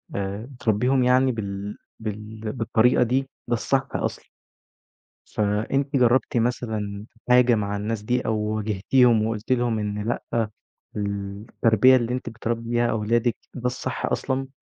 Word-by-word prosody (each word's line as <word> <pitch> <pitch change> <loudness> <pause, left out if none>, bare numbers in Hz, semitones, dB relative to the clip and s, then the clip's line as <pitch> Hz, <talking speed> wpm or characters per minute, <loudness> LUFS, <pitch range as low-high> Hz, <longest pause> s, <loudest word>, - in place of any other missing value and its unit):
آآ، 100 +2 -3
بتربيهم 125 0 +1
يعني 130 +1 +4
بال 100 -2 -5 0.2
بال 110 0 -5
بالطريقة 125 +1 +3
دي، 125 +3 +1 0.3
ده 120 - 0
الصح 130 +3 +1
أصلًا - - -3 1.0
فأنتِ 110 +7 0
جربتِ 125 -1 +3
مثلًا 110 -4 -2 0.2
حاجة 125 -1 +6
مع 100 -1 -1
الناس 105 +1 -3
دي 125 +3 +1
أو 110 - +1
واجهتيهم، 110 +2 +2
وقلتِ 110 +3 -4
لهم 120 -3 +2
إن 105 0 -3
لأ 115 -2 -1 0.5
التربية 105 +4 +2
اللي 120 -1 0
أنتِ 125 -1 -3
بتربي 115 +1 -4
بيها 120 0 +2
أولادِك 115 +2 +1 0.2
ده 125 -2 -7
الصح 125 0 -2
أصلًا؟ 135 0 -1
115 Hz, 130 wpm, -24 LUFS, 105-125 Hz, 1.0 s, حاجة